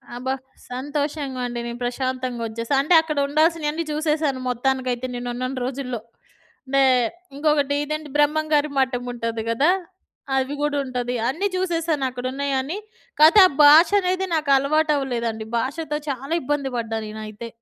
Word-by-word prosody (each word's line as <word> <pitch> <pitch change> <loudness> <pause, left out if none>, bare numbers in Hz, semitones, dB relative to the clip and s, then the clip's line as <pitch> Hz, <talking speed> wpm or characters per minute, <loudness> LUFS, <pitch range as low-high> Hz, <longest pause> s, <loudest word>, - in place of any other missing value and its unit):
అబ్బా! 260 +2 -2 0.4
సంతోషంగా 285 0 -3
అండి. 240 0 -5
నేను 235 +1 -6
ప్రశాంతంగొచ్చేశా. 245 -2 -3
అంటే, 310 +5 +2
అక్కడ 305 -2 -4
ఉండాల్సినియన్నీ 315 +1 +1
చూసేశాను 300 -3 0
మొత్తానికైతే 255 0 -1
నేనున్నన్ని 250 +2 -4
రోజుల్లో. 255 -3 -4 0.7
మే 275 0 +5 0.5
ఇంకొకటి 285 -1 +1
ఇదేంటి, 305 0 -4
బ్రహ్మంగారి 300 0 +2
మఠముంటది 245 -3 -2
గదా! 280 +9 +3 0.7
అవి 265 +2 -1
గూడుంటది. 255 -4 -1
అన్నీ 345 +10 0
చూసేశాను 335 -5 -1
అక్కడున్నయని. 265 +5 -2 0.4
కాతే, 320 +7 +8
ఆ - - -6
భాషనేదే 365 +5 +6
నాకలవాటవ్వలేదండి. 275 -6 +1
భాషతో 300 +4 -3
చాలా 275 +3 -5
ఇబ్బంది 280 0 -1
పడ్డా 225 -1 -2
నేనైతే. 215 +1 -7
275 Hz, 110 wpm, -23 LUFS, 245-305 Hz, 0.7 s, కాతే